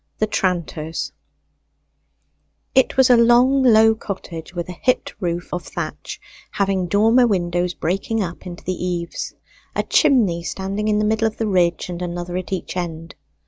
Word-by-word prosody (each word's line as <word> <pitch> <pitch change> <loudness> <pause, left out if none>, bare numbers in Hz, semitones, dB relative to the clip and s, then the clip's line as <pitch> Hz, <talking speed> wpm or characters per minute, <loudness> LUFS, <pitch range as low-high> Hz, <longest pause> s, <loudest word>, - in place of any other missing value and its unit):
THE 215 - +2
TRANTER'S 170 -5 -2 1.6
It 265 0 +3
was 260 -1 +6
a 245 - +7
long 245 +4 +5
low 225 -3 +6
cottage 185 -7 -7
with 175 -1 -3
a - - -6
hipped 255 - +1
roof 175 -2 -3
of 175 - -2
thatch, - - -6 0.3
having 195 -2 0
dormer 225 +6 +4
windows 175 -3 0
breaking 195 +6 -1
up 175 +1 -7
into 175 -1 -9
the 185 -1 -3
eaves, 175 -2 -3 0.4
a - - +1
chimney 230 - +3
standing 195 +4 -3
in 210 -1 +2
the 210 - +1
middle 220 +1 +2
of 220 - -6
the 225 - -1
ridge 180 -4 +1
and 175 -1 -6
another 175 0 -4
at 185 +1 -6
each 185 -1 -4
end. 165 -3 -5
185 Hz, 160 wpm, -21 LUFS, 175-220 Hz, 1.6 s, a